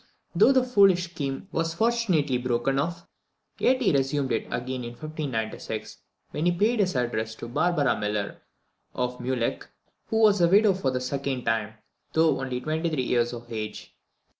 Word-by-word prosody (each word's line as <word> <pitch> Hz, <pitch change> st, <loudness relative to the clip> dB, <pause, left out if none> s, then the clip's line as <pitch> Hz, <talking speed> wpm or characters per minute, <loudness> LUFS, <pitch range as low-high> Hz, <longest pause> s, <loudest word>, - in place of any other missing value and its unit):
Though -, -, +6 dB
the 260 Hz, -2 st, +4 dB
foolish 195 Hz, -8 st, +4 dB
scheme 140 Hz, +2 st, -4 dB
was 165 Hz, 0 st, -1 dB
fortunately 185 Hz, -, +1 dB
broken 125 Hz, +2 st, 0 dB
off, 170 Hz, +3 st, -3 dB, 0.5 s
yet 260 Hz, +1 st, +3 dB
he 205 Hz, -, +4 dB
resumed 135 Hz, 0 st, 0 dB
it 115 Hz, -, -1 dB
again 125 Hz, +1 st, -3 dB
in 120 Hz, 0 st, -6 dB
1596, 140 Hz, -6 st, -5 dB, 0.3 s
when 155 Hz, +3 st, -1 dB
he -, -, +4 dB
paid 215 Hz, +7 st, +1 dB
his 185 Hz, -6 st, +1 dB
addresses 110 Hz, -3 st, -1 dB
to 115 Hz, -, -8 dB
Barbara 145 Hz, +3 st, +1 dB
Millar 105 Hz, -1 st, -3 dB, 0.5 s
of 125 Hz, 0 st, -2 dB
Muleckh, 125 Hz, -1 st, -2 dB, 0.4 s
who 220 Hz, 0 st, +1 dB
was 205 Hz, -3 st, +5 dB
a 170 Hz, -, +6 dB
widow 205 Hz, +2 st, +5 dB
for 180 Hz, -8 st, -1 dB
the 130 Hz, -1 st, -1 dB
second 135 Hz, 0 st, -3 dB
time, 110 Hz, -1 st, -1 dB, 0.4 s
though 160 Hz, -4 st, +3 dB
only 130 Hz, -2 st, -3 dB
twenty 155 Hz, +5 st, -1 dB
three 150 Hz, -5 st, -1 dB
years 120 Hz, -1 st, +1 dB
of 120 Hz, -1 st, -8 dB
age. 110 Hz, -1 st, -6 dB
140 Hz, 165 wpm, -26 LUFS, 125-175 Hz, 0.5 s, Though